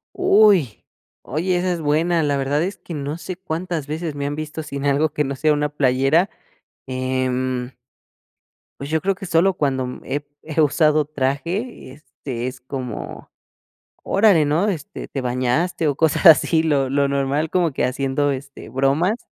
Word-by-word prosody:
Uy. 210 - +4 0.4
Oye, 175 +6 -1
esa 180 0 0
es 170 - -3
buena. 160 +3 +1
La 145 -2 +1
verdad 140 +2 0
es 190 +3 -3
que 170 - -9
no 145 +2 -4
sé 185 +1 -6
cuántas 170 -3 -4
veces 155 +1 -4
me 140 0 -3
han 145 - -3
visto 155 +1 -5
sin 140 -2 -5
algo 145 +2 +2
que 150 - 0
no 135 0 -3
sea 155 +3 +2
una 150 0 0
playera, 145 +5 +2 0.6
em. 130 -1 -2 1.1
Pues 140 +1 -6
yo 160 0 +1
creo 195 +2 0
que 195 - -8
solo 175 +3 +3
cuando 130 -5 -2
he 145 +1 -3 0.2
he 160 0 -1
usado 150 0 +3
traje, 145 - -3
este, 130 -4 -7
es 130 0 -6
como, 125 -3 -6 0.7
órale, 195 -7 +4
¿no? 160 +8 +1
Este, 160 -7 -5
te 135 - -5
bañaste 130 +7 0
o 145 -2 +1
cosas 160 +3 +1
así, 160 -1 +6
lo 145 -4 +1
lo 140 +1 +1
normal 140 +3 0
como 175 -4 +1
que - - -1
haciendo, 135 +2 0
este, 140 -2 -7
bromas. 140 - +1
150 Hz, 165 wpm, -21 LUFS, 135-165 Hz, 1.1 s, así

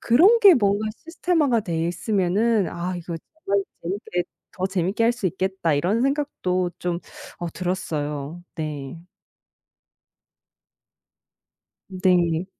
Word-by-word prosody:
그런 370 - +5
게 395 -4 +9
뭔가 205 -3 +2 0.2
시스템화가 325 -7 +1
돼 165 -5 -2
있으면은 205 +3 +1
'아 180 +1 -3
이거 170 0 -6 0.4
정말 200 - +3 0.2
재밌게 180 0 -2 0.3
더 185 - 0
재밌게 190 +4 0
할 235 - +4
수 235 -5 -3
있겠다.' 190 -2 0
이런 180 +10 +1
생각도 260 -11 0
좀 175 -1 -2 0.4
어 175 - -3
들었어요. 160 -4 -3
네. 150 -2 -5 2.9
네. 180 -3 +2
185 Hz, 215 characters per minute, -24 LUFS, 170-225 Hz, 2.9 s, 게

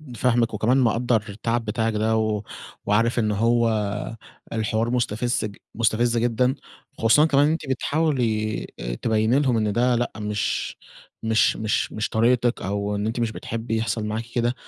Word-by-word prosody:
فاهمِك، 120 -1 +1
وكمان 125 +4 +2
مقدّر 120 -2 +2
التعب 115 +3 -2
بتاعِك 110 +1 -1
ده، 110 +1 +1
و 110 -1 0 0.4
وعارف 115 +4 +2
إن 110 -2 +1
هو 110 -1 +1 0.6
الحوار 110 +1 0
مستفز- 120 -1 0 0.3
مستفز 115 +1 +1
جدًا، 120 +2 +2 0.4
خصوصًا 115 +7 +5
كمان 145 -2 +4
إن 155 - +2
أنتِ 160 -3 -4
بتحاولي 125 -6 0 0.4
تبيّني 110 +3 +2
لهم 130 -5 +2
إن 110 -2 +1
ده 125 +3 +2
لأ 120 +1 -1
مش 105 -1 -2 0.5
مش 110 0 +3
مش 110 -1 -1
مش 110 - -2
طريقتِك 120 +1 +2
أو 100 +1 -2
إن 105 +1 -2
أنتِ 115 +2 -2
مش 115 -2 0
بتحبي 115 +1 -4
يحصل 110 -1 -1
معاكِ 110 +2 -3
كده، 120 0 +1
115 Hz, 150 wpm, -24 LUFS, 110-120 Hz, 0.6 s, خصوصًا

